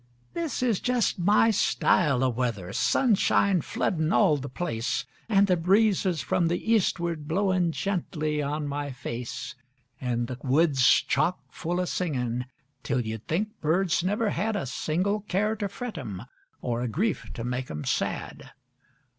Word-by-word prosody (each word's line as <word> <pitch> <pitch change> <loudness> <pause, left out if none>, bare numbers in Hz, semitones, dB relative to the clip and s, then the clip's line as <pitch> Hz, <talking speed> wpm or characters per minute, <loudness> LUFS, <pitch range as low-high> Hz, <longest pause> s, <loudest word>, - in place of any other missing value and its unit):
This 330 -6 -2
is 230 -6 +1
jes' 245 -6 +1
my 210 +5 +4
style 150 - +2
o' 130 - +3
weather 115 -6 -2
sunshine 200 - +3
floodin' 160 +2 -1
all 185 -8 +4
the 140 -1 -5
place, 125 -2 -2 0.2
An' 200 -2 +5
the 185 -2 +3
breezes 190 -1 +2
from 170 +8 +1
the 175 +7 0
eastward 170 -7 0
blowin' 185 0 +1
gently 155 -5 -2
on 145 +1 -2
my 145 0 -3
face. 125 -2 -5 0.5
An' 120 -1 -1
the 125 +1 -6
woods 140 0 +2 0.2
chock 155 +6 +1
full 175 +1 -3
o' 180 - +1
singin' 125 -9 -2 0.3
till 125 - 0
you'd 110 0 -6
think 210 +7 -2
birds 170 +2 +1
never 205 +3 0
had 215 +5 -1
A 200 - -2
single 180 +10 -1
care 210 +2 0
to 205 -1 -2
fret 225 -3 -6
'em 105 -7 -6 0.4
or 120 -1 -1
a 125 - -1
grief 175 - -1
to 115 - -5
make 125 +1 -3
'em 75 -1 -5
sad. - - -2
165 Hz, 155 wpm, -27 LUFS, 130-200 Hz, 0.5 s, An